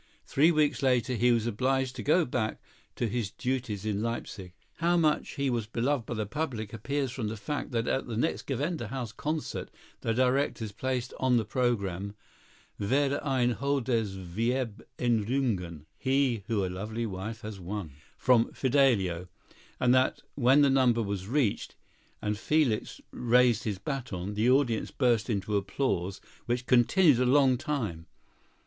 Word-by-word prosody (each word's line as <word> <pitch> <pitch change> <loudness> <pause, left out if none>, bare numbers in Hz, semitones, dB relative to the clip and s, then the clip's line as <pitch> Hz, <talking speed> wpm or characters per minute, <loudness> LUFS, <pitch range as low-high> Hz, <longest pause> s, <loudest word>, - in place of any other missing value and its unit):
Three 155 +5 +4
weeks 150 -6 +2
later 125 -2 +2
he 125 +1 +3
was 115 -2 +2
obliged 130 +3 0
to 125 - -5
go 155 - +3
back 115 -4 -2 0.4
to 120 - -1
his 115 -2 -2
duties 125 -4 -3
at 110 - 0
Leipsic. 105 -4 -4 0.2
How 170 +1 +2
much 155 -3 +1
he 140 -1 0
was 120 -4 -1
beloved 120 +2 -1
by 120 - -3
the 110 -1 -2
public 110 -3 -4
appears 135 +4 -2
from 120 -4 -3
the 110 +1 -4
fact 145 +8 -4
that 115 -2 -1
at 130 - 0
the 115 -2 -4
next 160 +8 -1
Gewandhaus 135 -4 -3
concert 155 +3 -3 0.3
the 115 - -1
directors 125 -2 +1
placed 125 +2 -3
on 130 -2 +3
the 110 - 0
programme, 100 -5 -1 0.6
"Wer 140 +6 +1
ein 130 -4 +2
Holdes 120 -6 0
Weib 115 +5 -2 0.2
Errungen" 110 - 0
(He 130 -6 +1
who 105 -4 0
a - - -1
Lovely 110 +6 -4
Wife 110 +3 -5
has 105 -2 -7
Won) 95 -2 -5 0.3
from 120 -3 +3
"Fidelio," 115 -11 +2 0.5
and 125 0 +4
that 130 0 +2
when 135 +2 +5
the 140 - +4
number 125 -4 +3
was 100 -2 -4
reached, 125 -4 0 0.5
and 105 0 -1
Felix 145 -6 0
raised 120 -1 +3
his 105 -4 -1
bâton, 105 - -4
the 110 +4 +2
audience 125 -4 +2
burst 120 -3 +1
into 105 -1 -1
applause 100 -3 -1 0.3
which 120 +1 -1
continued 130 +4 +5
a 125 - +3
long 135 -1 +5
time. 115 - -3
120 Hz, 155 wpm, -29 LUFS, 105-135 Hz, 0.6 s, when